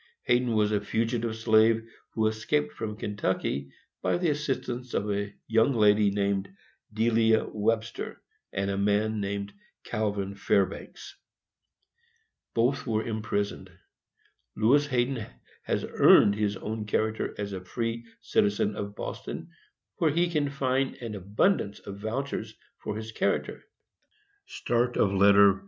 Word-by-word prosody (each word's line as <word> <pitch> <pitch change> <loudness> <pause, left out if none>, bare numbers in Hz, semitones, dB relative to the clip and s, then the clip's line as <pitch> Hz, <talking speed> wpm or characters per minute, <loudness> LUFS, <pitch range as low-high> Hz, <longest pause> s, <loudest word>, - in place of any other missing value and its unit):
Hayden 120 -1 +2
was 105 -1 +2
a 105 -1 +1
fugitive 115 0 -1
slave, 110 +1 +4 0.3
who 110 -1 +2
escaped 110 +7 0
from 105 -1 -5
Kentucky 85 -9 -2 0.3
by - - +1
the 175 -3 +1
assistance 130 -4 -3
of 105 +1 0
a 100 0 -2
young 115 +4 +3
lady 105 -1 +5
named 100 -1 0 0.4
Delia 110 0 +3
Webster, 110 +1 -2 0.3
and 100 0 -1
a 100 - -2
man 105 +2 +1
named 100 0 -3 0.3
Calvin 100 -2 -2
Fairbanks. 100 -1 -1 1.4
Both 130 +4 +1
were 110 -1 0
imprisoned. 105 -2 -2 0.9
Lewis 140 +7 +4
Hayden 125 -3 0 0.4
has - - -1
earned 100 - +6
his 105 -1 -1
own 110 +1 -5
character 110 +1 -1
as 100 -1 -4
a 95 - -5
free 115 +4 -3 0.2
citizen 100 +1 +1
of 100 0 -5
Boston, - - -6 0.5
where 160 - +3
he 170 +3 +1
can 150 -3 +1
find 135 -1 0
an 115 -4 -6
abundance 100 - +1
of 100 0 -9
vouchers 110 0 -3 0.2
for 105 - -4
his 110 0 -6
character. - - -1
110 Hz, 120 wpm, -28 LUFS, 100-120 Hz, 1.4 s, earned